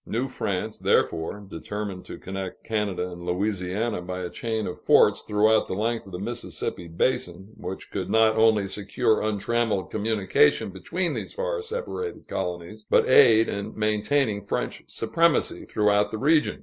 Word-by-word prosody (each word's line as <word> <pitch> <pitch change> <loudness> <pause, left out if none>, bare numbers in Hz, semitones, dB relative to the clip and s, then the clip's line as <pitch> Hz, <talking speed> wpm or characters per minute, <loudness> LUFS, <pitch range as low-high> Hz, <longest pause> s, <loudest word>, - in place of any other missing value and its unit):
New 120 +4 -1
France, 105 -4 -3
therefore, 100 +5 0
determined 100 +1 -5
to - - -8
connect 95 -1 -6
Canada 100 -5 -2
and 85 0 -9
Louisiana 95 +3 -1
by 90 +1 -5
a 90 - -5
chain 110 -2 -2
of - - -6
forts - - +5
throughout 110 +1 +3
the - - -3
length 115 +1 -1
of - - -11
the 90 - -5
Mississippi 105 -4 -4
basin, 90 +1 -1
which 90 +1 -7
should - - -3
not 110 0 +4
only 110 -2 +4
secure 105 +4 0
untrammeled 110 -1 0
communication 100 -5 +2
between 165 - -2
these - - -5
far - - -2
separated 450 -1 -5
colonies, 90 +5 -5
but - - +4
aid 115 0 +7
in 100 +2 -5
maintaining 110 +1 +1
French 100 - -3
supremacy 170 -1 +1
throughout 105 -1 +2
the 110 - -4
region. 150 +6 +2
105 Hz, 150 wpm, -25 LUFS, 95-115 Hz, -, aid